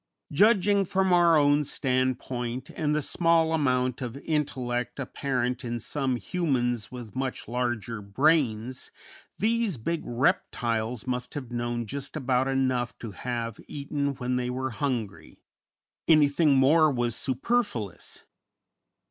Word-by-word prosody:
Judging 200 +3 +4
from 190 0 +1
our 170 -2 +6
own 145 0 +4
standpoint 130 -2 -2
and 150 -1 -1
the 150 - 0
small 165 +1 +2
amount 130 -5 +1
of 125 0 -4
intellect 130 -5 -2
apparent 125 -1 -2
in 120 -1 -3
some 135 +1 -1
humans 120 - -1
with 120 -5 -9
much 130 0 -3
larger 120 -2 -2
brains, 125 +1 +1 0.5
these 225 - +1
big 165 +9 -2
reptiles 120 - 0
must 125 0 -3
have 130 -4 -6
known 120 0 -2
just 140 +7 -6
about 130 -2 +1
enough 130 -2 0
to 115 - -7
have 115 +2 -4
eaten 140 -1 -2
when 125 0 -1
they 125 0 -1
were 130 +1 -2
hungry, 115 - -4 0.6
anything 150 -1 +5
more 155 +4 +5
was 120 -4 -1
superfluous. 130 - -2
130 Hz, 125 wpm, -27 LUFS, 120-150 Hz, 0.6 s, our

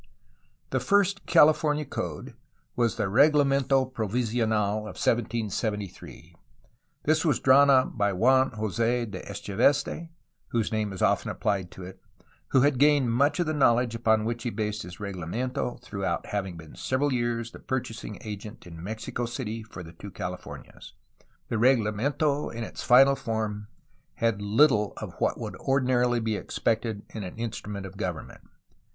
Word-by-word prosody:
The - - +1
first 200 -1 +1
California 150 0 +4
code - - -5 0.4
was 120 -3 +1
the - - -1
Reglamento 135 +3 +3
Provisional 110 -2 0
of 105 0 -7
1773. 110 -4 -2 0.7
This 155 +1 +2
was 155 -5 +2
drawn 140 +2 +6
up 130 -2 +4
by 100 -3 +1
Juan 130 +7 +4
Jos6 115 +1 -1
de 95 - -6
Echeveste 135 - 0 0.4
(whose 115 -2 -1
name 110 -2 -1
is 95 - -4
often - - +2
applied 95 -3 -1
to 95 - -11
it), 95 +1 -10 0.5
who 130 - +3
had 140 -2 +2
gained 145 -4 +4
much 140 +8 +2
of 175 - +2
the 155 - -1
knowledge 120 -4 +3
upon 110 -1 +2
which 120 +1 -2
he 120 - -2
based 105 0 -3
his 90 0 -9
reglamento 105 +6 -3
through 100 -6 -4 0.2
having 95 -4 -4
been 80 -2 -12
for - - -15
several 135 +2 0
years 120 -1 -1
the - - -11
purchasing 115 -5 -4
agent 105 +1 -8
in 85 -2 -10
Mexico 110 +4 -4
City 115 -2 -4
for 110 -5 -10
the 85 0 -12
two 100 +4 -10
Califomias. 90 -1 -8 0.6
The 115 - -1
reglamento 130 +5 +1
in 115 0 -5
its - - -7
final 135 +3 +6
form 110 -3 -3 0.5
had 115 -3 0
little 105 0 +3
of - - -7
what - - 0
would - - -5
ordinarily 125 -2 +2
be 110 -2 -1
expected 110 -1 -2
in 110 - -6
an 90 +3 -8
instrument 105 -3 -5
of 95 +1 -10
government. 90 -6 -5
115 Hz, 155 wpm, -27 LUFS, 105-130 Hz, 0.7 s, drawn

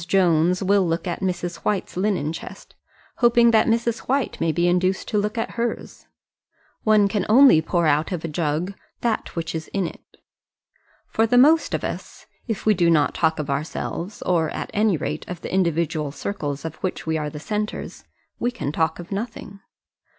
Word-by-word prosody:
Jones 180 0 +3
will 195 -1 +3
look 165 +3 -1
at 175 - -3
Mrs. 175 -2 -2
White's 205 -3 -2
linen 185 -5 0
chest, 165 - -10 0.4
hoping 235 -1 +5
that 220 -1 +4
Mrs. 230 0 +1
White 270 -1 0
may 165 - +2
be 170 +3 +1
induced 185 +2 +1
to 210 - +1
look 210 +2 -2
at 225 - -2
hers. 235 0 -4 0.7
One 215 -2 +4
can 200 -1 -1
only 250 - +7
pour 170 +1 0
out 155 +4 +2
of 170 -3 -3
a - - -1
jug 160 +4 -1 0.3
that 235 -2 -1
which 165 -1 -3
is 160 -1 -4
in 195 -2 -1
it. - - -7 1.1
For 225 +1 +1
the 245 - +3
most 310 +6 +5
of - - -4
us, - - -6 0.2
if 225 -4 -3
we 215 - +5
do 175 -3 +2
not 150 -3 +3
talk 160 -1 +1
of 150 -2 -3
ourselves, 165 +6 -4
or 165 -3 +1
at - - -5
any 210 -4 +2
rate 150 - -4
of 180 -2 -6
the - - -6
individual 165 -5 0
circles 145 -4 -4
of 160 -1 -5
which 185 - -4
we 160 0 0
are 150 -1 -3
the 150 - -8
centres, 210 +6 -4 0.4
we 240 - +1
can 245 - -4
talk 160 +1 0
of 175 +2 -10
nothing. 205 -1 -5
180 Hz, 185 wpm, -23 LUFS, 160-215 Hz, 1.1 s, only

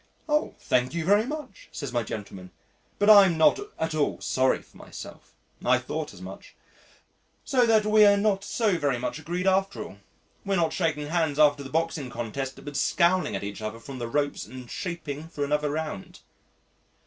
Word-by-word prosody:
"Oh! 300 0 0
thank 125 +4 0
you 170 -2 -2
very 205 +5 +4
much," 300 -2 -7
says 140 -4 -6
my 120 - +1
gentleman, 100 -4 -7 0.5
"but 205 - +1
I'm 200 -5 +8
not 160 - +5 0.2
at 160 0 -2
all 150 -2 0
sorry 130 0 +1
for - - -21
myself." - - -11 0.3
"I - - +4
thought - - -4
as - - -12
much. - - -10 0.9
So 250 -3 +3
that 220 -2 +4
we 215 0 +6
are 200 0 +6
not 200 -1 +1
so 205 -4 0
very 140 -4 +1
much 125 +5 -4
agreed 175 +4 -3
after 195 +1 +1
all. 95 - -11 0.5
We're 195 0 0
not 165 -3 +1
shaking 150 -4 -1
hands 160 -4 0
after 145 -2 +4
the 135 - -8
boxing 160 -4 -1
contest, 130 +4 -5
but 145 -1 -7
scowling 170 - +2
at 95 - -4
each 100 +1 -6
other 110 +1 -5
from 130 +3 -9
the 120 - -3
ropes 145 +3 -1
and 125 -2 -10
shaping 160 -4 -5
for 145 -3 -3
another 150 +1 0
round." 155 -9 -5
155 Hz, 185 wpm, -26 LUFS, 135-190 Hz, 0.9 s, I'm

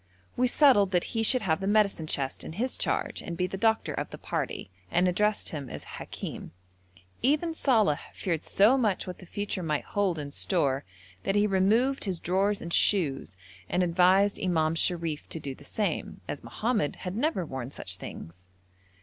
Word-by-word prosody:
We 250 +1 +3
settled 245 -7 +5
that 180 - +3
he 225 - +1
should 240 +2 +1
have 160 -4 +1
the 195 - -1
medicine 200 -6 +2
chest 135 -3 -3
in - - -7
his 245 +8 -2
charge - - -2
and 170 - -6
be 180 - +1
the 185 - -4
doctor 220 +3 +1
of - - -3
the - - -8
party, 95 - -3 0.2
and 180 +1 +3
addressed 210 +4 +1
him 145 -5 -5
as - - -7 0.2
Hakim. - - -7 0.7
Even 305 +6 +2
Saleh 220 - +3
feared 165 -4 -2
so 225 +7 +4
much 210 -6 +1
what 180 - -7
the 180 - -12
future 205 -1 -3
might 155 -3 -1
hold 200 -5 0
in 145 -2 -5
store, 140 - 0 0.4
that 195 - 0
he 205 0 +4
removed 215 +8 +2
his 185 -4 -2
drawers 195 +4 +1
and 170 - -5
shoes, 140 - +1 0.3
and 180 - +2
advised 185 +3 +4
Imam 160 -4 +2
Sharif 165 -2 -1
to 160 - -5
do 140 -3 -5
the - - -15
same, 210 -2 -2
as - - -5
Mohammed 215 - -1
had 180 +1 -3
never 240 - 0
worn 130 -4 -5
such 95 -9 -7
things. 90 +1 -9
185 Hz, 185 wpm, -28 LUFS, 160-210 Hz, 0.7 s, settled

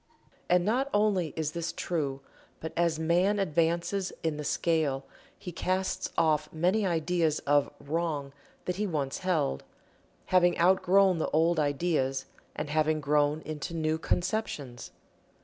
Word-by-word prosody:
And 180 0 +4
not 255 +6 +1
only 200 -6 +2
is 155 -2 -2
this 170 +1 -3
true, 145 -6 -2 0.4
but 160 0 -6
as 170 -2 +1
man 175 +6 +2
advances 170 +2 0
in 160 -2 -1
the 150 - -4
scale 150 -3 0 0.3
he 180 - -7
casts 185 +3 -1
off 155 -2 +2
many 185 +6 +1
ideas 165 -2 +1
of 145 0 +3
"Wrong" 150 -2 -2 0.3
that 180 0 -2
he 210 +1 0
once 145 -6 -2
held, 160 - 0 0.7
having 175 -1 +5
outgrown 185 +1 +4
the - - -1
old 165 +1 +2
ideas 145 -3 0 0.3
and 150 -1 -4
having 155 0 +2
grown 150 +1 +1
into 155 +2 -5
new 160 0 0
conceptions. 175 - -2
165 Hz, 135 wpm, -29 LUFS, 150-180 Hz, 0.7 s, having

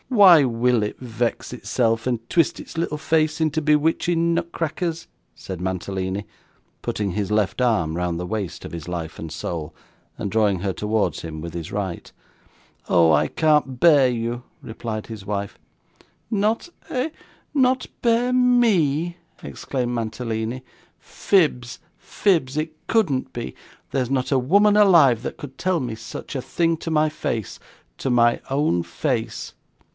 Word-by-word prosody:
'Why 190 - +8
will 120 -2 +2
it 105 - -4
vex 120 0 -3
itself, 115 0 0
and 120 -2 -2
twist 165 -4 +2
its - - -10
little 165 -2 -1
face 155 0 +1
into 160 0 +1
bewitching 165 +3 +2
nutcrackers?' 165 0 -2 0.3
said 95 -2 -7
Mantalini, 95 +1 -3 0.6
putting 100 -2 -2
his 100 +1 -2
left 105 +2 +1
arm 90 -11 +1
round 85 -1 -1
the 90 - -3
waist 100 -2 -4
of - - -8
his 85 0 -6
life 85 -3 -5
and 80 -1 -6
soul, 80 -1 -5 0.4
and 100 - -3
drawing 105 -4 +2
her 95 -1 -1
towards 105 -6 -1
him 80 -2 -6
with 85 0 -7
his 85 -2 -6
right. 95 -4 -4 0.8
'Oh! 85 -2 +5
I - - +3
can't 150 -5 +1
bear 145 -5 +6
you,' 120 0 -3 0.2
replied 110 -1 -5
his 110 -4 -8
wife. 100 -1 -3 0.7
'Not 215 - 0 0.2
eh, 265 +4 -1 0.4
not 260 -2 +2 0.2
bear 240 +1 +2
ME!' 195 - +3 0.3
exclaimed 125 -3 -3
Mantalini. 115 +2 -3 0.3
'Fibs, 130 -10 0 0.2
fibs. 155 -9 0
It 155 +1 -2
couldn't 175 - +1
be. 65 - -6 0.4
There's 130 -3 0
not 130 0 0
a 135 - +4
woman 200 +11 +4
alive, 165 - +6
that - - -5
could 135 -2 -9
tell 185 -2 +1
me 120 -5 -3
such 115 +4 -8
a 130 - -1
thing 165 +5 0
to 165 - -5
my 155 0 +3
face 115 -8 -4 0.4
to - - -2
my 120 -1 +3
own 135 - +1
face.' 85 - -3
Mr. - - -43
125 Hz, 150 wpm, -23 LUFS, 105-165 Hz, 0.8 s, Why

